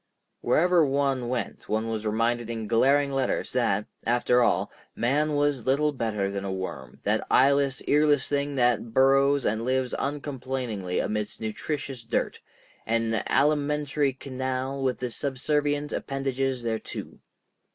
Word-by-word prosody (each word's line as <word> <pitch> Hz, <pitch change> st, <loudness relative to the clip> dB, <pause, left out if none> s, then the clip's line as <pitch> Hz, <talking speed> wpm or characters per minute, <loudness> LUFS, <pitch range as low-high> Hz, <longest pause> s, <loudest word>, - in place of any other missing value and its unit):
Wherever 170 Hz, +7 st, +4 dB
one 135 Hz, -3 st, 0 dB
went 125 Hz, -2 st, -4 dB
one 110 Hz, +1 st, 0 dB
was 110 Hz, -1 st, -3 dB
reminded 115 Hz, +2 st, 0 dB
in 115 Hz, -2 st, -4 dB
glaring 140 Hz, +5 st, +3 dB
letters 135 Hz, -2 st, -1 dB
that, 105 Hz, -5 st, +1 dB, 0.2 s
after 120 Hz, +1 st, +3 dB
all, 120 Hz, -, +2 dB, 0.2 s
man 145 Hz, +5 st, +1 dB
was 145 Hz, -4 st, 0 dB
little 150 Hz, +3 st, +3 dB
better 105 Hz, -7 st, -2 dB
than 100 Hz, 0 st, -4 dB
a 100 Hz, -, -3 dB
worm, 95 Hz, 0 st, -6 dB
that -, -, +1 dB
eyeless, 140 Hz, 0 st, +3 dB
earless 145 Hz, -1 st, +3 dB
thing 145 Hz, 0 st, -1 dB
that 120 Hz, -3 st, +1 dB
burrows 135 Hz, +1 st, +4 dB
and 110 Hz, +2 st, 0 dB
lives 130 Hz, 0 st, 0 dB
uncomplainingly 130 Hz, -9 st, -3 dB
amidst 105 Hz, -1 st, -2 dB
nutritious 130 Hz, +4 st, -4 dB
dirt, 115 Hz, +1 st, -2 dB, 0.5 s
"an 115 Hz, 0 st, +1 dB, 0.2 s
alimentary 145 Hz, -1 st, +1 dB
canal 130 Hz, +1 st, -3 dB
with 130 Hz, -2 st, 0 dB
the 125 Hz, -1 st, -4 dB
subservient 145 Hz, +3 st, -1 dB
appendages 135 Hz, -2 st, -2 dB
thereto." 110 Hz, -1 st, -5 dB
130 Hz, 130 wpm, -26 LUFS, 115-140 Hz, 0.5 s, Wherever